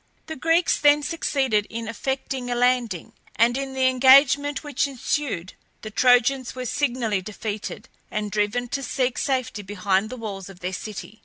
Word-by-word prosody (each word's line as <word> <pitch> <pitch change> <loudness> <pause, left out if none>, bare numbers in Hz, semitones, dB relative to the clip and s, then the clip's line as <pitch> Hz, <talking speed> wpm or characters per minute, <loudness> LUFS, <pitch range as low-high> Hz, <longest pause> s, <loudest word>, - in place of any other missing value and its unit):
The 315 - -6
Greeks 330 +4 +2
then 290 0 +5
succeeded 265 -10 0
in 230 0 -5
effecting 260 +2 -3
a 245 - 0
landing, 240 -7 0 0.2
and 235 +2 +3
in 270 0 -4
the 260 0 +2
engagement 275 +2 +5
which 290 -1 0
ensued 255 -8 -3 0.3
the 215 - -6
Trojans 250 +2 +3
were 255 0 -5
signally 240 -7 0
defeated, 210 +1 -6 0.2
and 210 -1 -3
driven 215 +4 0
to 275 - -2
seek 255 -1 -1
safety 255 -6 -1
behind 200 +1 0
the 255 - -7
walls 200 -4 -6
of 190 -2 -13
their 180 +1 -3
city. 215 +2 -7
245 Hz, 160 wpm, -24 LUFS, 215-270 Hz, 0.3 s, then